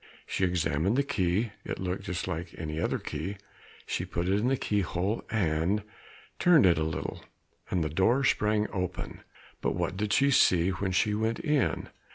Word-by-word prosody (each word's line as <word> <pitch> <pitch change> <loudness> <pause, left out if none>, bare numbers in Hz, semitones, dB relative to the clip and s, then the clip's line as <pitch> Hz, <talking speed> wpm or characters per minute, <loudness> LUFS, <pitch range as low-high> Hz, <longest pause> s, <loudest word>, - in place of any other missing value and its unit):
She - - -2
examined 90 +2 +1
the 140 - +3
key, 100 -2 0
it - - -4
looked 95 +1 -3
just 90 0 -3
like 85 -1 -4
any 80 -1 -4
other; - - 0 0.9
she - - -2
put 85 +1 -3
it 100 +2 +2
in 115 - +1
the 135 +1 +2
keyhole 100 0 -1
and 95 0 +1 0.6
turned 170 - +6
it 85 -3 +4
a - - +1
little, 80 0 -4 0.5
and 90 -3 +1
the 75 - -1
door 105 - +2
sprang 105 -4 +2
open. 90 -3 -4 0.4
But - - 0
what 90 +2 -2
did 105 0 -1
she 140 +6 +4
see 90 -8 +4
when 95 +1 -2
she 105 +3 +2
went 110 +2 0
in? 150 -5 0
95 Hz, 175 wpm, -29 LUFS, 85-110 Hz, 0.9 s, turned